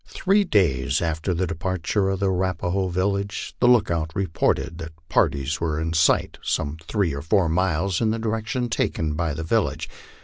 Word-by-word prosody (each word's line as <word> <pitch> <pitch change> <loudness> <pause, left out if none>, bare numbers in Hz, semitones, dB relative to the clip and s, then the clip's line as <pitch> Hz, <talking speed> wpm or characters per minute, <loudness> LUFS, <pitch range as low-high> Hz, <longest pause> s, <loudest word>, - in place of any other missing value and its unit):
Three 200 +2 +2
days 80 - +2
after 80 +2 -1
the 90 +1 0
departure 95 +4 -1
of 95 0 -2
the 95 -1 +2
Arapaho 95 0 -1
village, 100 +3 -2
the 120 - +4
lookout 90 -10 +3
reported 85 -2 0
that 85 -1 -7 0.2
parties 70 +3 +1
were 80 -2 -1
in 80 +1 -2
sight 80 0 +2
some 70 +2 -2
three 100 -8 0
or 70 - -4
four 85 +3 +2
miles 90 +2 0
in 110 - +2
the 110 - 0
direction 115 +2 -2
taken 80 -9 -1
by 80 -1 -1
the 80 - -4
village. 80 - 0
90 Hz, 170 wpm, -24 LUFS, 80-100 Hz, 0.2 s, the